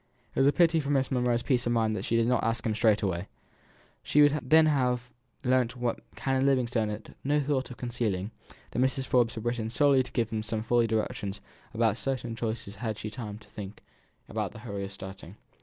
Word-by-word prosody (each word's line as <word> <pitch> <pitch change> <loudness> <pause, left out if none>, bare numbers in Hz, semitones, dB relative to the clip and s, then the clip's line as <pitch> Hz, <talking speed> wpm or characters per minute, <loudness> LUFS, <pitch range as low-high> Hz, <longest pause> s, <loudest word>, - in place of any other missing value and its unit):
It - - -2
was 135 - +5
a - - +6
pity 165 0 +4
for 140 -2 -3
Miss 135 -2 +1
Monro's 125 -2 +1
peace 125 -3 +1
of 120 - +2
mind 110 -2 +2
that - - -4
she 115 - 0
did 115 0 +3
not 125 0 +2
ask 115 0 0
him 110 - +1
straight 110 -1 +3
away. 90 -1 -1 0.7
She 150 - +4
would 145 +1 +4
then 155 +5 +5
have 125 -5 +1 0.3
learnt 125 -2 +2
what 120 -1 -1 0.2
Canon 135 -1 0
Livingstone 125 -5 +2
had 105 +1 -7
no 145 +2 +2
thought 140 -2 0
of 125 - -9
concealing, 115 -5 -2 0.4
that - - -3
Mrs. 130 0 +1
Forbes 120 -4 +2
had 110 0 -6
written 120 -2 -1
solely 135 +3 +4
to 130 - -6
give 115 -3 0
him 110 -1 -1
some 110 0 -3
fuller 120 0 +3
directions 105 -2 -2 0.3
about 110 -1 +1
certain 125 -4 -2
charities 115 0 -3
than 100 - -8
she 110 - -13
had 110 -3 -3
had 105 0 -6
time 105 -5 -6
to 105 - -17
think 105 0 -9 0.4
about - - -2
in - - -19
the - - -10
hurry 100 -4 -5
of 100 - -5
starting. 95 -1 -9
120 Hz, 225 wpm, -29 LUFS, 110-130 Hz, 0.7 s, a